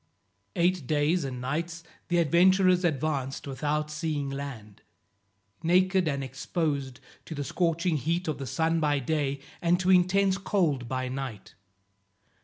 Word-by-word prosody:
Eight 175 -5 +1
days 155 +3 +2
and 130 -2 -4
nights 165 +6 -3 0.2
the 175 - +1
adventurers 180 +3 +4
advanced 145 -4 -1
without 150 +2 -2
seeing 150 -3 -2
land; 125 -8 -7 0.8
naked 185 +1 +3
and 140 -2 -1
exposed 135 0 -3 0.3
to 160 - -7
the 145 - -3
scorching 170 +2 0
heat 165 +5 -1
of 150 -3 -2
the 135 - -5
sun 165 +6 +1
by 150 -2 +2
day, 140 0 -1 0.2
and 175 +1 +3
to 185 0 +2
intense 190 +1 +3
cold 160 - 0
by 130 0 -2
night. 130 -6 -6
155 Hz, 135 wpm, -28 LUFS, 135-175 Hz, 0.8 s, adventurers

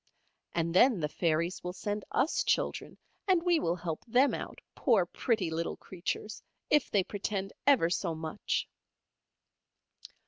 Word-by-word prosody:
And 165 0 0
then 230 +2 +5
the 150 - 0
fairies 170 +3 -1
will 180 0 -4
send 205 +3 -4
us 310 - +1
children, - - -1 0.3
and 365 -3 +3
we 345 -2 +3
will 170 - 0
help 165 -3 -5
them 255 +5 +4
out, - - -5 0.2
poor 220 -9 +3
pretty 190 -2 -1
little 165 +1 -2
creatures, 190 +3 -5 0.3
if 295 -2 +4
they 200 -2 +2
pretend 195 0 -3
ever 240 -13 +5
so 170 -2 -1
much." 160 +4 -2
190 Hz, 140 wpm, -31 LUFS, 170-230 Hz, 0.3 s, then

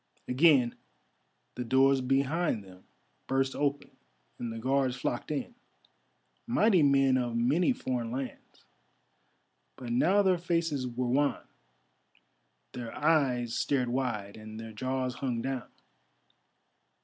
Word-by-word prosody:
Again 130 -3 +4 0.8
the 125 - -4
doors 135 +2 +3
behind 135 - 0
them 95 -1 -16 0.4
burst 135 0 0
open 145 0 -1 0.5
and 120 - -4
the 115 - -6
Guards 130 +2 +1
flocked 120 -1 -3
in—mighty 225 - -2
men 135 -2 +4
of 120 -2 -2
many 140 - +2
foreign 125 - -3
lands; 130 +2 -7 1.1
but 125 -2 -7
now 185 +12 +3
their 185 -2 +3
faces 165 -6 -1
were 125 +1 -3
wan, 140 +4 0 1.3
their 120 -2 -6
eyes 135 -7 +2
stared 130 -2 0
wide, 120 -6 -2
and 110 0 -9
their 115 0 -8
jaws 130 +3 -2
hung 125 -2 -3
down. 130 -2 -4
130 Hz, 115 wpm, -30 LUFS, 120-145 Hz, 1.3 s, Again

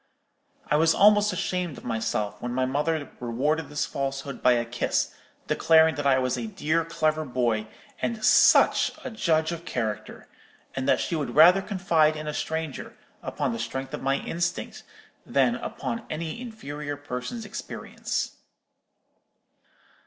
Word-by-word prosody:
"I 150 - +2
was 160 +1 +4
almost 210 +1 +5
ashamed 180 -6 -2
of - - -11
myself 115 -3 -2
when 120 0 -3
my 130 0 +1
mother 145 +2 -1
rewarded 140 +6 -1
this 150 +1 -1
falsehood 135 0 -4
by 125 - +5
a 120 -1 0
kiss, 120 +1 -1 0.3
declaring 160 0 +4
that 145 0 -2
I 135 -1 +5
was 130 -1 0
a 225 - -4
dear 165 -5 0
clever 155 -1 0
boy, 120 -5 -1 0.3
and 225 -2 -1
such - - +5
a 260 - -5
judge 160 -7 +1
of 170 0 -5
character, 110 -9 -4 0.5
and 130 0 -1
that - - +4
she 170 - -2
would 150 -3 -3
rather 180 +5 +8
confide 170 -6 +2
in 155 0 -6
a 150 - -2
stranger, 160 -3 -4 0.2
upon - - -2
the 115 - -4
strength 130 +4 -4
of - - -4
my 135 +1 +1
instinct, 170 +5 -3 0.4
than, - - +2
upon 230 - -5
any 160 +7 -4
inferior 150 - -6
person's 145 - -5
experience. - - -5
150 Hz, 150 wpm, -26 LUFS, 130-170 Hz, 0.5 s, rather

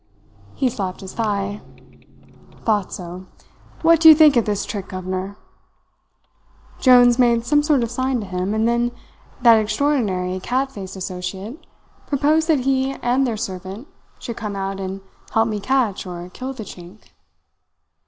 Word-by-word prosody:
"He 265 - +1
slapped 195 -6 -4
his 190 -1 -9
thigh. 205 -2 -2 1.0
"'Thought 210 -4 +1
so. 180 +1 -8 0.6
What 330 0 +5
do 320 - +10
you 315 - +10
think 305 -2 +6
of 235 - +3
this 205 -2 -1
trick, 200 -3 -5
governor?' 185 +2 -5 1.4
"Jones 245 -1 +6
made 235 -2 +3
some 295 +3 +3
sort 295 -4 +2
of 230 - -3
sign 255 +1 -1
to - - -6
him, 185 +2 -2
and 220 +1 +1
then 240 0 +1 0.5
that 230 -2 +7
extraordinary 215 -6 0
cat 260 +7 -1
faced 195 -5 -8
associate 190 - -6 0.4
proposed 300 +3 +2
that 310 -5 +3
he 265 +1 0
and 255 +2 +2
their 225 -3 -2
servant 195 - -6 0.3
should 235 - -7
come 210 -3 -5
out 195 0 -4
and 190 0 -5 0.3
help 225 +1 +3
me 215 -2 -2
catch 230 -4 0
or 175 0 -7
kill 260 +1 -5
the 255 -4 -7
Chink. 180 +1 -13
220 Hz, 155 wpm, -21 LUFS, 190-260 Hz, 1.4 s, do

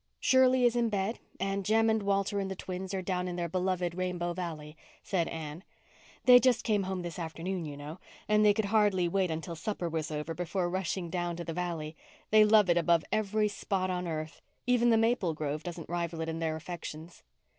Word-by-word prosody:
"Shirley 260 -1 +4
is 240 0 +3
in 235 -1 +2
bed 205 +2 -1 0.2
and 195 +1 -1
Jem 225 +3 +3
and 220 -1 +2
Walter 200 0 0
and 195 -1 -2
the 190 - -4
twins 185 +1 -5
are 190 -1 -2
down 180 0 -1
in 180 - -4
their 175 -1 -2
beloved 180 0 -1
Rainbow 175 -1 -2
Valley," 160 -4 -6 0.3
said 175 -4 0
Anne. 160 +1 -6 0.6
"They 250 -1 +9
just 245 -2 +3
came 210 -2 +2
home 190 -1 -3
this 175 0 -6
afternoon, 170 +2 -4
you 145 -2 -7
know, 150 +4 -8 0.3
and 210 0 +4
they 210 - +7
could 210 +1 0
hardly 200 -4 +3
wait 185 +1 +1
until 160 +1 -4
supper 175 +2 -3
was 160 -2 -2
over 150 +1 -3
before 175 +1 -2
rushing 185 -2 -2
down 175 -1 -2
to 170 - -5
the 165 - -5
valley. 165 -3 -3 0.4
They 215 0 +7
love 210 -1 +5
it 175 -1 +3
above 170 -1 +3
every 215 0 +1
spot 195 -2 -2
on 180 -1 -2
earth. 155 -1 -5 0.2
Even 245 -1 +3
the 225 - +5
maple 225 -7 +1
grove 150 0 -3
doesn't 170 0 -7
rival 170 -1 -3
it 160 - -2
in 160 0 -3
their 160 -1 -1
affections." 165 0 -8
180 Hz, 210 wpm, -30 LUFS, 165-205 Hz, 0.6 s, They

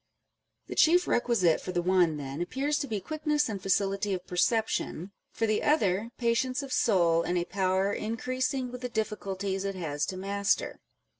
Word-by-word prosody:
The - - -6
chief 355 +3 +4
requisite 210 -9 +2
for 185 - -5
the 175 - +1
one, 180 -4 +3
then, 140 +2 -5
appears 280 +11 -1
to 285 - -3
be 215 -4 -2
quickness 300 - -1
and 205 -4 -4
facility 195 +1 +1
of 180 - -8
perception 195 -1 0 0.2
â€" - - -22
for 225 - +2
the 215 -1 +1
other, 215 - +2
patience 255 +3 0
of 275 - -5
soul, 170 -6 +3
and 175 +1 -1
a 175 - 0
power 190 +1 0
increasing 255 +4 -2
with 250 0 -8
the 250 - -3
difficulties 200 -3 -3
it 195 -1 -3
has 150 -5 -2
to 185 - -4
master. 200 +1 -1
200 Hz, 175 wpm, -29 LUFS, 185-250 Hz, 0.2 s, chief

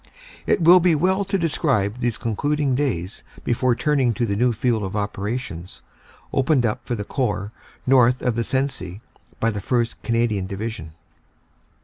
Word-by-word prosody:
It 175 - +2
will 175 +3 +8
be 175 -2 +3
well 190 +6 +2
to 195 +1 0
describe 135 - 0
these 120 -2 -1
con 115 -3 -3
cluding 145 +1 0
days 115 -9 -2 0.2
before 120 +1 +1
turning 135 -5 +1
to 120 - 0
the 100 -3 -1
new 120 +4 +3
field 115 0 0
of 95 0 -4
operations 100 -3 -4 0.5
opened 135 -2 +2
up 105 - -1
for 120 - -1
the 105 - -4
Corps 105 -3 -2 0.3
north 125 -1 +4
of 125 - +1
the 115 +1 -1
Sensee 115 -8 -2 0.4
by 115 - +2
the 105 -2 -4
1st. 120 +2 0
Cana 115 0 +1
dian 100 -4 -2
Division. 100 -4 -5
120 Hz, 165 wpm, -22 LUFS, 105-135 Hz, 0.5 s, will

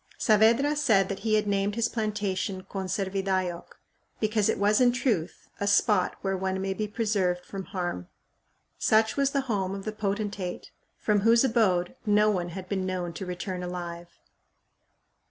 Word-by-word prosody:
Saavedra 230 +6 +4
said 220 -10 +3
that 195 - -4
he 220 -1 +1
had 215 0 +2
named 200 0 0
his 230 0 +1
plantation 205 -4 -2
Conservidayoc, 190 -2 -3 0.4
because 215 -1 +1
it - - +1
was 210 +3 +3
in 245 -1 +6
truth 225 - -2
"a 200 - -1
spot 200 -1 +3
where 195 -1 -1
one 190 0 -2
may 190 0 -1
be 210 +2 -3
preserved 200 -5 0
from 195 -2 -6
harm." 175 - -4 0.7
Such 220 0 +3
was 275 -1 +2
the 275 0 0
home 200 -7 -2
of 195 - -7
the 215 - -2
potentate 205 -3 -3 0.3
from 210 -1 +1
whose 230 +4 +5
abode 200 -8 +2
"no 210 0 +4
one 175 -3 -2
had 185 +1 -7
been 190 -1 -1
known 180 -2 -3
to 185 +2 -6
return 180 +1 -4
alive." 175 -1 -5
200 Hz, 160 wpm, -27 LUFS, 185-215 Hz, 0.7 s, in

